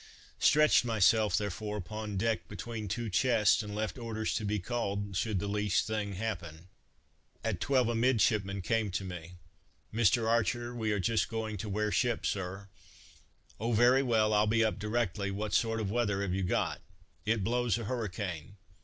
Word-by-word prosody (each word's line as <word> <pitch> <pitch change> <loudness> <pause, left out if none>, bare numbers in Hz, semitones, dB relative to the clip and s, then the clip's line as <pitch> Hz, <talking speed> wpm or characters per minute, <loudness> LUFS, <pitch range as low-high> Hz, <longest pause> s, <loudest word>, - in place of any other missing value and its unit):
Stretched 150 -3 +5
myself, 110 -2 +3
therefore, 105 +1 -3
upon 105 +1 -5
deck 115 +2 0
between 115 -3 -6
two 115 +5 -3
chests, 105 +1 +3
and 105 -1 -6
left 110 +3 -3
orders 110 -2 -2
to - - -2
be 105 +1 0
called, 100 -2 -3
should 110 +2 0
the 100 - -2
least 105 -1 +1
thing 105 -2 -2
happen. 90 -5 -5 0.7
At 105 -6 -2
twelve 130 -4 +2
a 120 - 0
midshipman 110 -5 +2
came 110 +2 0
to 95 +1 -3
me: 90 -2 -7 0.6
"Mr. 115 +1 +3
Archer, 120 +1 +1
we 110 -3 -1
are 105 - 0
just 100 0 +1
going 110 -1 -3
to 105 +2 -5
wear 105 +1 0
ship, 120 +1 +1
Sir!" 95 +1 -3 0.9
"O, 115 +3 -1
very 120 +4 +5
well, 110 -4 +2
I'll 105 0 +3
be 115 +1 +3
up 110 -2 -1
directly, 105 -2 -1
what 100 +1 -3
sort 115 -1 +2
of 100 -3 -2
weather 105 -4 0
have 95 -2 -2
you 95 - -1
got?" 90 - -1 0.4
"It 110 -2 0
blows 120 +1 +1
a 115 - -5
hurricane." 100 -7 -4
110 Hz, 170 wpm, -31 LUFS, 100-115 Hz, 0.9 s, Stretched